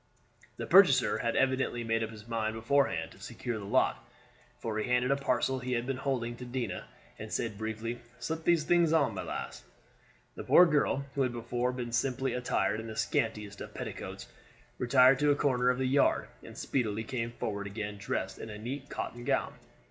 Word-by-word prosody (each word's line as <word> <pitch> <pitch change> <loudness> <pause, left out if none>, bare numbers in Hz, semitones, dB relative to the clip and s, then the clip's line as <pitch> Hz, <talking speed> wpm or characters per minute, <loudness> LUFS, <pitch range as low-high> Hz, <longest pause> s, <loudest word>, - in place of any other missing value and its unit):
The - - -4
purchaser - - +6
had - - -1
evidently 130 -2 +1
made 115 0 0
up 110 - -3
his 110 0 -12
mind 110 -1 -1
beforehand 135 +5 +1
to - - -16
secure 120 -3 -5
the 100 - -7
lot, - - +1 0.5
for 110 -1 -3
he 110 - -2
handed 125 +1 +2
a - - +4
parcel 130 -1 0
he 125 0 -3
had 120 0 0
been 135 0 -2
holding 125 -3 -2
to 125 - -8
Dinah, 120 -6 -4 0.3
and - - -7
said 115 -3 -2
briefly, 110 +3 -4 0.2
"Slip 160 0 -4
those 170 -2 +3
things 170 0 +3
on, 155 -4 +3
my - - -4
lass." - - -6 0.7
The - - -7
poor 180 - +7
girl, 145 -3 +1
who 140 - -1
had 130 -2 +2
before 120 +1 -1
been 125 -2 -5
simply 130 +2 0
attired 125 -3 0
in 110 - -6
the 110 - -6
scantiest 105 -1 -1
of - - -8
petticoats, - - -6 0.5
retired 130 +1 +5
to 150 0 +3
a 145 - +5
corner 125 -3 +2
of 125 - +2
the 130 - 0
yard, 135 +2 +2
and - - -12
speedily 110 -4 -1
came 115 0 -3
forward 100 -3 -3
again 105 0 -5
dressed 100 - -3
in 110 - -7
a 105 - -7
neat 130 +6 -6
cotton 120 0 -5
gown. - - 0
120 Hz, 195 wpm, -31 LUFS, 110-135 Hz, 0.7 s, poor